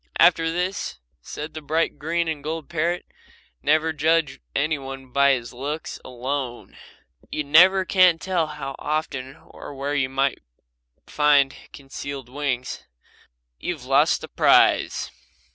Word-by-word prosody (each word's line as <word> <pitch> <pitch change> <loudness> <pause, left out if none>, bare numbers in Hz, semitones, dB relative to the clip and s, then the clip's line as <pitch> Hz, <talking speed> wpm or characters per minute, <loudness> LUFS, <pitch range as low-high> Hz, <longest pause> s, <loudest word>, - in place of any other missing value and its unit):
"After 165 -1 +4
this," 180 +3 -3 0.2
said 150 +1 -7
the 155 - -7
bright 155 0 -1
green 165 +3 -1
and 155 -3 -3
gold 160 0 -4
parrot, 170 +2 -1 0.6
"never 155 +1 +2
judge 155 -2 +1 0.2
any 155 +1 +1
one 135 -1 -9
by 140 +1 +4
his 120 -2 -4
looks 145 +6 -5
alone. 130 0 -5 0.6
You 150 - -2
never 185 +6 +6
can 185 -3 +5
tell 175 -2 -1
how 140 -3 -6
often 140 -3 -3
or 145 - -12
where 140 +2 -3
you 135 -3 +1
may 135 +1 0 0.7
find 145 -2 +3 0.2
concealed 135 -2 -8
wings. 130 -2 -3 0.8
You - - -2
have - - -14
lost - - +3
the - - -7
prize." - - +3
150 Hz, 135 wpm, -23 LUFS, 135-160 Hz, 0.8 s, never